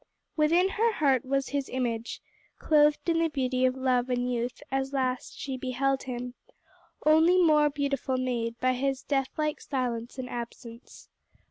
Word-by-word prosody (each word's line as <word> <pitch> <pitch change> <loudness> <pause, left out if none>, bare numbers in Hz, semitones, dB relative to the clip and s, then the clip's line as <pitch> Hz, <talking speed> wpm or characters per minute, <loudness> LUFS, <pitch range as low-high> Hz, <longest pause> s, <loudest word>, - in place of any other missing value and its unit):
"Within 335 +5 +3
her 455 +3 +1
heart 275 - +2
was 275 +1 -1
his 280 -2 -2
image, 235 -3 -3 0.3
Cloth'd 295 0 +3
in 330 -1 +2
the 330 - +3
beauty 255 -3 0
of 255 0 +1
love 255 -1 +1
and 250 0 0
youth, 240 +3 -3
as 270 0 -1
last 255 -2 -2
she 265 -2 -4
beheld 265 +1 -1
him, 250 -1 -5 0.7
Only 320 +4 +5
more 305 -4 +5
beautiful 280 -2 -1
made 240 -2 -2
by 255 0 +2
his 270 +1 -2
deathlike 295 +2 -1
silence 245 -3 -3
and 255 -1 -4
absence." 235 0 -9
265 Hz, 150 wpm, -28 LUFS, 250-295 Hz, 0.7 s, Only